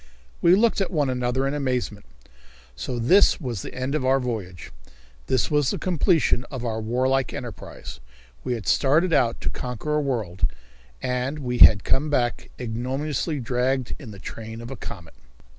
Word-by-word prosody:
We 170 Hz, +2 st, +6 dB
looked 220 Hz, 0 st, +3 dB
at 195 Hz, -, 0 dB
one 145 Hz, -6 st, +1 dB
another 125 Hz, +1 st, 0 dB
in 135 Hz, -, -1 dB
amazement. 125 Hz, -7 st, -2 dB, 0.7 s
So 90 Hz, -, -4 dB
this 175 Hz, -, +5 dB
was 120 Hz, -, -4 dB
the -, -, -8 dB
end 130 Hz, +2 st, -2 dB
of 155 Hz, -, 0 dB
our 135 Hz, +1 st, +3 dB
voyage! 105 Hz, -8 st, -5 dB, 0.6 s
This 130 Hz, -, +1 dB
was 145 Hz, -3 st, +3 dB
the -, -, -1 dB
completion 165 Hz, -7 st, +2 dB
of 130 Hz, -3 st, -6 dB
our 110 Hz, -1 st, -2 dB
warlike 130 Hz, +3 st, +1 dB
enterprise. 115 Hz, -, -8 dB, 0.4 s
We 125 Hz, -, -1 dB
had 115 Hz, -5 st, -5 dB
started 160 Hz, +6 st, +3 dB
out 115 Hz, -6 st, +2 dB
to -, -, -1 dB
conquer 125 Hz, +4 st, -4 dB
a -, -, +2 dB
world, 110 Hz, -10 st, -1 dB, 0.5 s
and 125 Hz, +3 st, -1 dB
we 125 Hz, -4 st, -3 dB
had 100 Hz, -3 st, +8 dB
come 150 Hz, +3 st, +1 dB
back 120 Hz, -5 st, 0 dB
ignominiously 135 Hz, +6 st, -2 dB
dragged 125 Hz, +1 st, 0 dB
in 125 Hz, -, -9 dB
the 100 Hz, -, -9 dB
train 110 Hz, +3 st, -8 dB
of 115 Hz, +2 st, -8 dB
a -, -, -4 dB
comet. 90 Hz, -9 st, -9 dB
125 Hz, 170 wpm, -24 LUFS, 115-140 Hz, 0.7 s, had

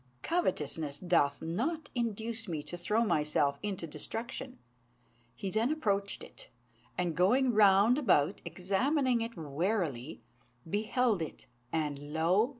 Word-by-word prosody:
Covetousness 155 Hz, -, -1 dB
doth 145 Hz, -5 st, +1 dB
not 275 Hz, -, -2 dB
induce 225 Hz, -1 st, -2 dB
me 160 Hz, -4 st, -3 dB
to 175 Hz, -, -6 dB
throw 210 Hz, +6 st, +1 dB
myself 150 Hz, -5 st, +1 dB
into 200 Hz, -5 st, -3 dB
destruction." 235 Hz, -, -6 dB, 0.8 s
He 195 Hz, -, -4 dB
then 225 Hz, +6 st, +1 dB
approached 200 Hz, -10 st, -1 dB
it, -, -, -12 dB, 0.5 s
and, 175 Hz, -3 st, 0 dB
going 245 Hz, -, +4 dB
round 210 Hz, +4 st, +6 dB
about 185 Hz, -, +2 dB
examining 245 Hz, -, +1 dB
it 230 Hz, -2 st, -4 dB
warily, 160 Hz, -, -2 dB, 0.4 s
beheld 215 Hz, +2 st, +1 dB
it; 160 Hz, -, -6 dB, 0.3 s
and 145 Hz, -2 st, -2 dB
lo! 180 Hz, +9 st, +3 dB
195 Hz, 120 wpm, -32 LUFS, 160-235 Hz, 0.8 s, round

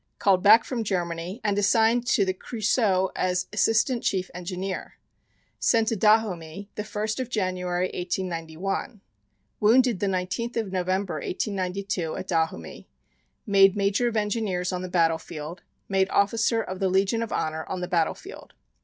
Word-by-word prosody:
Called 190 Hz, -2 st, +3 dB
back 215 Hz, +4 st, +7 dB
from 240 Hz, -4 st, -3 dB
Germany 175 Hz, 0 st, -3 dB
and 205 Hz, -1 st, +1 dB
assigned 225 Hz, +4 st, +3 dB
to 200 Hz, -, +3 dB
the 185 Hz, -, 0 dB
Creusot 205 Hz, -2 st, 0 dB
as 180 Hz, 0 st, 0 dB
Assistant 225 Hz, +3 st, +2 dB
Chief 190 Hz, -1 st, -1 dB
Engineer. 180 Hz, +1 st, -5 dB, 0.6 s
Sent 225 Hz, -1 st, +3 dB
to 225 Hz, -, 0 dB
Dahomey, 200 Hz, -3 st, +1 dB
the -, -, -4 dB
1st 215 Hz, +2 st, -3 dB
of 255 Hz, -, -3 dB
January, 185 Hz, -4 st, -1 dB
1891. 180 Hz, +4 st, -3 dB, 0.6 s
Wounded 235 Hz, 0 st, +4 dB
the 200 Hz, -, 0 dB
19th 190 Hz, +6 st, -2 dB
of 220 Hz, -4 st, -2 dB
November, 185 Hz, 0 st, -1 dB
1892, 190 Hz, -1 st, -3 dB
at 185 Hz, -, -6 dB
Dahomey. 160 Hz, -, -2 dB, 0.6 s
Made 195 Hz, -1 st, +5 dB
Major 200 Hz, +4 st, +1 dB
of 230 Hz, -2 st, -1 dB
Engineers 205 Hz, -4 st, -1 dB
on 180 Hz, -, -2 dB
the 185 Hz, -, -5 dB
battle 165 Hz, -2 st, +2 dB
field. 160 Hz, +2 st, -8 dB, 0.3 s
Made 190 Hz, -1 st, +1 dB
Officer 225 Hz, +2 st, +2 dB
of 185 Hz, 0 st, -6 dB
the 190 Hz, -1 st, +1 dB
Legion 195 Hz, +4 st, +1 dB
of 230 Hz, -, -4 dB
Honor, 160 Hz, 0 st, -2 dB
on 185 Hz, -, -4 dB
the 180 Hz, -, -3 dB
battle 170 Hz, -3 st, +1 dB
field. -, -, -12 dB
195 Hz, 155 wpm, -25 LUFS, 180-215 Hz, 0.6 s, back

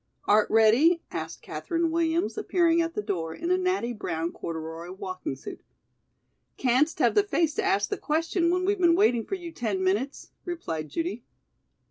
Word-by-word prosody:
"Art 210 Hz, +1 st, +4 dB
ready?" 245 Hz, +11 st, +5 dB
asked -, -, -6 dB
Katherine 335 Hz, -2 st, -2 dB
Williams, 330 Hz, +2 st, 0 dB
appearing 340 Hz, -5 st, +2 dB
at 330 Hz, 0 st, -3 dB
the 210 Hz, -, -2 dB
door 165 Hz, -5 st, -3 dB
in 340 Hz, +2 st, -3 dB
a 365 Hz, -, +4 dB
natty 365 Hz, -10 st, 0 dB
brown 170 Hz, -6 st, -3 dB
corduroy 165 Hz, +1 st, -6 dB
walking 185 Hz, -6 st, -5 dB
suit. 130 Hz, -, -9 dB, 1.0 s
"Can'st 265 Hz, +5 st, +2 dB
have -, -, +3 dB
the 415 Hz, -, +5 dB
face 345 Hz, -6 st, 0 dB
to -, -, -1 dB
ask 205 Hz, +1 st, +1 dB
the -, -, -1 dB
question 330 Hz, +3 st, 0 dB
when 365 Hz, +1 st, +1 dB
we've 405 Hz, 0 st, +1 dB
been 340 Hz, -1 st, +5 dB
waiting 245 Hz, -, +3 dB
for 390 Hz, -, -2 dB
you 350 Hz, -3 st, -8 dB
ten 210 Hz, -9 st, -2 dB
minutes?" 210 Hz, +10 st, -1 dB
replied 165 Hz, -, -4 dB
Judy. 335 Hz, -, -3 dB
305 Hz, 170 wpm, -27 LUFS, -, 1.0 s, ready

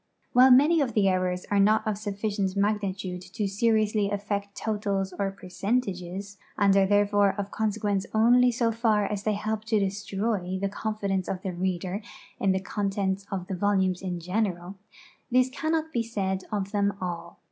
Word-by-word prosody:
While 255 Hz, +2 st, +7 dB
many 295 Hz, +6 st, +6 dB
of 245 Hz, -5 st, -1 dB
tlie 210 Hz, -2 st, +3 dB
errons 180 Hz, -1 st, -1 dB
are 205 Hz, -, +3 dB
not 215 Hz, +2 st, +4 dB
of 215 Hz, -1 st, 0 dB
sufficient 205 Hz, -1 st, -2 dB
magnitude 200 Hz, -3 st, -1 dB
to 190 Hz, +3 st, -3 dB
seriously 215 Hz, 0 st, +1 dB
affect 200 Hz, 0 st, -3 dB
totals 200 Hz, -3 st, -2 dB
or 200 Hz, -1 st, +1 dB
percentages, 195 Hz, 0 st, -3 dB, 0.2 s
and 200 Hz, -1 st, +4 dB
are 195 Hz, -1 st, +4 dB
therefore 205 Hz, 0 st, +3 dB
of 200 Hz, 0 st, -4 dB
consequence 210 Hz, -2 st, -1 dB
only 245 Hz, +3 st, +5 dB
so 235 Hz, -1 st, +1 dB
far 220 Hz, -2 st, +2 dB
as 205 Hz, 0 st, -3 dB
they 215 Hz, +1 st, 0 dB
help 215 Hz, +1 st, -3 dB
fo 220 Hz, -, +3 dB
di 195 Hz, -2 st, +2 dB
stroy 200 Hz, -2 st, -2 dB
the 200 Hz, +1 st, -1 dB
conli 215 Hz, +1 st, -4 dB
•lenceof 190 Hz, -1 st, -1 dB
the 190 Hz, -, -3 dB
reader 185 Hz, +2 st, -2 dB, 0.4 s
in 195 Hz, -, +2 dB
the 190 Hz, 0 st, 0 dB
I'ontentsof 195 Hz, -2 st, -2 dB
the 190 Hz, -, -3 dB
volumes 190 Hz, -1 st, +1 dB
in 180 Hz, -2 st, -3 dB
general, 180 Hz, 0 st, -2 dB, 0.5 s
this 255 Hz, +1 st, +3 dB
cannot 320 Hz, +2 st, -1 dB
be 235 Hz, -, +1 dB
said 195 Hz, -4 st, -2 dB
of 200 Hz, -2 st, -2 dB
them 200 Hz, -1 st, 0 dB
all. 170 Hz, -2 st, -5 dB
200 Hz, 170 wpm, -27 LUFS, 190-215 Hz, 0.5 s, While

